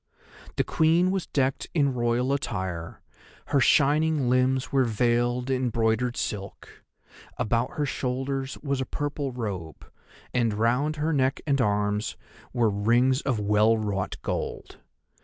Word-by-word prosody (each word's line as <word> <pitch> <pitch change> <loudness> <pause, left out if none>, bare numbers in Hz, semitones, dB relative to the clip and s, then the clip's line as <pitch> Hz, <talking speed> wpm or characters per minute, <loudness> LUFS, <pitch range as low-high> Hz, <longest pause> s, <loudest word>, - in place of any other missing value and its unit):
The - - +2
Queen 165 +3 +2
was 190 -2 -2
decked 135 -1 0
in 140 -4 +2
Royal 120 +2 +1
attire, 95 -11 -4 0.5
her 140 - +3
shining 145 0 +3
limbs 130 +1 +1
were 135 -2 +3
veiled 120 +2 +1
in 130 -1 +1
broidered 115 +2 0
silk; 100 -1 -6 0.5
about 115 +3 0
her 150 - -1
shoulders 135 0 -3
was 140 -2 -1
a - - -2
purple 145 -1 -3
robe, 100 -10 -6 0.5
and 115 -4 +1
round 125 +8 +1
her 155 +2 -1
neck 135 -1 +1
and 140 -3 +2
arms 105 -1 0 0.3
were 120 -4 +2
rings 120 +6 +2
of 130 -6 -1
well 105 +2 +3
wrought 100 -3 -2
gold. - - -4
125 Hz, 135 wpm, -26 LUFS, 110-140 Hz, 0.5 s, her